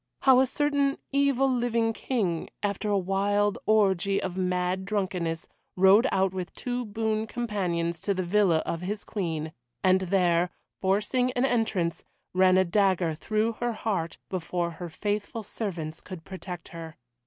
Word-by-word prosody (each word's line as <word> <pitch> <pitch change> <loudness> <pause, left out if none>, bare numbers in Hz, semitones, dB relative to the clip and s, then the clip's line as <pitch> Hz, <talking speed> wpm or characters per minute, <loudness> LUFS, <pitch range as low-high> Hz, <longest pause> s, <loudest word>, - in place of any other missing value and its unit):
How 260 -2 +6
a 265 - +4
certain 285 0 +1
evil 275 -1 +3
living 235 -3 +1
King, 195 -10 -1
after 205 +1 -1
a 205 - +3
wild 200 +2 +1
orgie 195 -3 +3
of 180 -2 -4
mad 180 0 0
drunkenness, 185 -5 -2 0.3
rode 195 +6 +6
out 190 0 +2
with 185 -1 -5
two 245 0 -3
boon 220 +1 -1
companions 180 -8 -2
to 200 - 0
the 185 - -1
villa 180 -3 +3
of 165 - -3
his 205 +3 -3
Queen, 160 -6 -3 0.3
and 185 0 +4
there, 180 -2 +2 0.3
forcing 210 +7 +1
an 245 +1 +2
entrance, 215 -9 0 0.3
ran 185 0 +5
a 190 - +4
dagger 185 -3 +2
through 215 +7 0
her 240 -1 0
heart 195 -7 -2
before 175 -2 -2
her 170 +1 -7
faithful 210 +5 -3
servants 170 -7 -5
could 180 -4 -9
protect 180 -2 -8
her. 165 -2 -8
195 Hz, 150 wpm, -27 LUFS, 180-220 Hz, 0.3 s, How